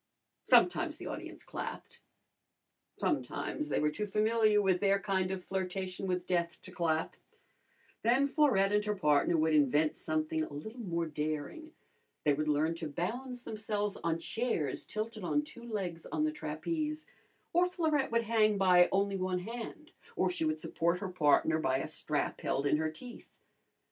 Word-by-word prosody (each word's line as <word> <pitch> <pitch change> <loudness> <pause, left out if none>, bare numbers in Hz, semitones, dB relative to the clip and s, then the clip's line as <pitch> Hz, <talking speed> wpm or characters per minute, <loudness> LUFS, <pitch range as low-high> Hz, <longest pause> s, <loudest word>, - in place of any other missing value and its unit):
Sometimes - - +4
the - - -8
audience - - -7
clapped. - - -7 1.0
Sometimes 300 - -2
they - - +1
were 150 0 +2
too 210 +7 -3
familiar 215 +1 +3
with 190 -3 +2
their 200 0 +3
kind 190 -2 0
of 190 -1 -4
flirtation 190 0 -3
with 180 -1 -1
death 170 -2 0
to 185 - -9
clap. 165 -3 0 0.9
Then 250 +5 +3
Florette 265 -10 +3
and 210 0 +3
her 210 0 0
partner 150 -1 +3
would 160 0 +2
invent 150 +1 +3
something 155 0 -1
a - - -6
little 220 - -7
more 170 -6 -1
daring. 155 - -4 0.5
They 145 - +4
would 155 +2 -1
learn 150 +2 +2
to 160 - -4
balance 240 - -4
themselves 210 -2 -2
on 165 -1 +1
chairs 170 - -1
tilted 215 -1 -4
on 295 +12 +1
two 270 -6 -11
legs 180 -6 -3
on 305 - -1
the 310 - +1
trapeze, 305 - -3 0.5
or 350 +1 +4
Florette 315 -7 0
would 230 0 +2
hang 215 -2 +3
by 180 -2 +6
only 200 0 +1
one 185 -1 -1
hand, 240 - -7 0.2
or - - +2
she 345 -3 -1
would 310 0 0
support 170 +2 0
her 190 +1 -4
partner 160 -2 +3
by 130 -4 +1
a 135 - -2
strap - - -2
held 140 - -1
in 145 - +3
her 155 0 0
teeth. 240 +11 -11
190 Hz, 165 wpm, -32 LUFS, 160-230 Hz, 1.0 s, by